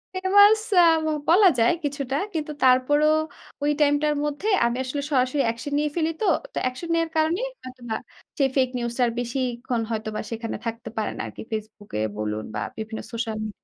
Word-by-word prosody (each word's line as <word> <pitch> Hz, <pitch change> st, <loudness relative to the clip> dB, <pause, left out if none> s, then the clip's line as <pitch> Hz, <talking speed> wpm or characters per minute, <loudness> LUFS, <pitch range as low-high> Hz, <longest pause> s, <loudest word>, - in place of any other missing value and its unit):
Famous 405 Hz, +3 st, +6 dB, 0.2 s
আ -, -, +9 dB, 0.5 s
বলা 380 Hz, +4 st, +7 dB
যায় 230 Hz, +8 st, +4 dB
কিছুটা। 280 Hz, -2 st, -2 dB, 0.2 s
কিন্তু 305 Hz, -2 st, -3 dB
তারপরও 260 Hz, +4 st, +4 dB, 0.6 s
ওই 295 Hz, -, +3 dB
টাইম 290 Hz, 0 st, +5 dB
টার 300 Hz, 0 st, +2 dB
মধ্যে 295 Hz, +7 st, -3 dB, 0.2 s
আমি 235 Hz, +1 st, 0 dB
আসলে 275 Hz, +2 st, -3 dB
সরাসরি 260 Hz, +1 st, +2 dB
অ্যাকশন 235 Hz, +5 st, -3 dB
নিয়ে 300 Hz, 0 st, +1 dB
ফেলি 325 Hz, -1 st, +1 dB
তো। -, -, +1 dB, 0.3 s
তো, -, -, -6 dB
অ্যাকশন 255 Hz, +7 st, -4 dB
নেওয়ার 330 Hz, -1 st, +1 dB
কারণেই 335 Hz, +10 st, +1 dB, 0.2 s
হয়তোবা 250 Hz, -3 st, -6 dB, 0.4 s
সেই 275 Hz, -2 st, +3 dB
ফেক 260 Hz, -2 st, +3 dB
নিউজটা 235 Hz, +1 st, -2 dB
আর -, -, -1 dB
বেশিক্ষণ 245 Hz, -1 st, -2 dB
হয়তোবা 215 Hz, -1 st, -3 dB
সেখানে 230 Hz, 0 st, -4 dB
থাকতে 230 Hz, +1 st, -4 dB
পারে 215 Hz, -, -1 dB
না -, -, -3 dB
আরকি। -, -, -9 dB
Facebook 215 Hz, -1 st, -6 dB
এ -, -, 0 dB, 0.2 s
বলুন 105 Hz, 0 st, -3 dB
বা 105 Hz, -, -2 dB, 0.2 s
বিভিন্ন 220 Hz, 0 st, -5 dB
সোশ্যাল 225 Hz, -2 st, -3 dB
মি 215 Hz, -, -3 dB
255 Hz, 180 wpm, -24 LUFS, 230-300 Hz, 0.6 s, আ